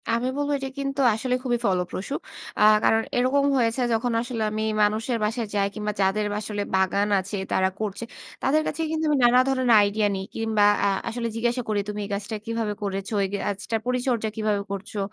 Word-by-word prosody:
আমি 235 +2 +1
বলবো 290 0 -1
এটা 270 -1 -5
কিন্তু 275 0 -2
আসলে 250 +4 -1
খুবই 245 -2 +1
ফলপ্রসূ। 185 +4 -1 0.5
আ - - +5 0.2
কারণ 225 - +4 0.2
এরকম 260 +3 +3
হয়েছে 235 +1 +1
যখন 235 +2 0
আসলে 235 -1 -4
আমি 215 0 -2 0.2
মানুষের 220 +4 +1
বাসায় 225 +1 -1
যাই। 200 -1 +2
কিংবা 210 -1 -3
যাদের 195 +2 +2 0.2
আসলে 210 -1 -3
বাগান 190 +2 +2
আছে, 195 +3 -5 0.2
তারা 190 0 +2
করছে। 215 0 -3 0.4
তাদের 300 +4 +3
কাছে 325 - -3
কিন্তু 320 0 -1
আমি 295 - +3
নানা 245 +1 +6
ধরনের 260 -4 +4
আইডিয়া 205 +1 +2
নিই। 190 0 -4
কিংবা 220 -2 +1 0.2
আ - - +4 0.2
আসলে 235 0 -3
জিজ্ঞাসা 240 +2 0
করি, 210 -1 +1
"তুমি 210 0 -4
এই - - -9
গাছটা 200 +2 -4
কিভাবে 230 -2 -2
করেছ? 195 -1 -3
এই - - 0 0.2
গাছটার 205 +2 -2
পরিচর্যা 250 -3 0
কিভাবে 215 -2 0
করছো? 200 +1 -5
220 Hz, 185 wpm, -25 LUFS, 205-250 Hz, 0.5 s, নানা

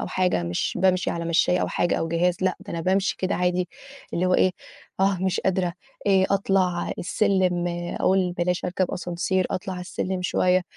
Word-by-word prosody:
أو - - -3
حاجة 180 - +1
مش 85 +1 -1
بامشي 185 -1 +2
على 170 0 -3
مشّاية 170 +2 +3
أو - - 0
حاجة 175 - 0
أو 165 - -2
جهاز 170 +1 +1
لأ، 185 -1 +1
ده - - -9
أنا 165 - -3
بامشي 190 +3 +1
كده 185 0 0
عادي 180 0 0 0.5
اللي 180 +2 +1
هو 185 - +3
إيه، 185 - +4 0.5
آه، 195 -1 +3
مش 190 -1 0
قادرة، 185 -2 0 0.3
آآ 190 -1 +4
أطلع 190 -3 +1
السلّم 185 -2 +1 0.3
أقول 185 -1 +2
بلاش 175 0 -1
أركب 180 0 0
ascenseur 180 +2 -1
أطلع 185 0 -3
على 180 - -6
السلّمِ 185 +1 -3
شوية، 180 0 +2
180 Hz, 185 wpm, -24 LUFS, 175-190 Hz, 0.5 s, إيه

